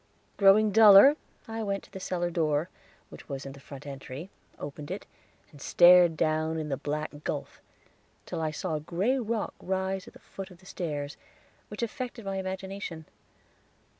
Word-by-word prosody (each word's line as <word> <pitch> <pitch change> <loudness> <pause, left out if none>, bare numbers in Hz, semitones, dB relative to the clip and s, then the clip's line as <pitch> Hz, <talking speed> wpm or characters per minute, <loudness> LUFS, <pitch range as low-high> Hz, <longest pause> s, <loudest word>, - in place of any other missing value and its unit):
Growing 205 +2 +5
duller, 215 +6 +9 0.3
I 225 0 -4
went 200 -2 -2
to - - -18
the 190 - -7
cellar 175 -2 -2
door, 155 0 0 0.4
which - - -13
was 140 -1 -5
in 135 - -6
the 140 - -12
front 140 0 -11
entry, 140 +4 -8 0.3
opened 145 +1 -7
it, 190 +3 -5 0.5
and 145 -3 -15
stared 175 -1 +6
down 155 +1 0
in 155 -1 -3
the 135 - 0
black 150 +1 -4
gulf, - - -5 0.6
till 170 - -4
I 160 - 0
saw 160 +2 -4
a 155 - -1
gray 190 - 0
rock 230 -2 -2
rise 190 0 -2
at - - -12
the - - -15
foot 195 -1 -9
of 180 - -15
the 185 - -21
stairs 150 -6 -4 0.5
which 210 +3 -5
affected 235 -1 -5
my 195 0 -2
imagination. 190 -3 -5
180 Hz, 170 wpm, -28 LUFS, 150-195 Hz, 0.6 s, duller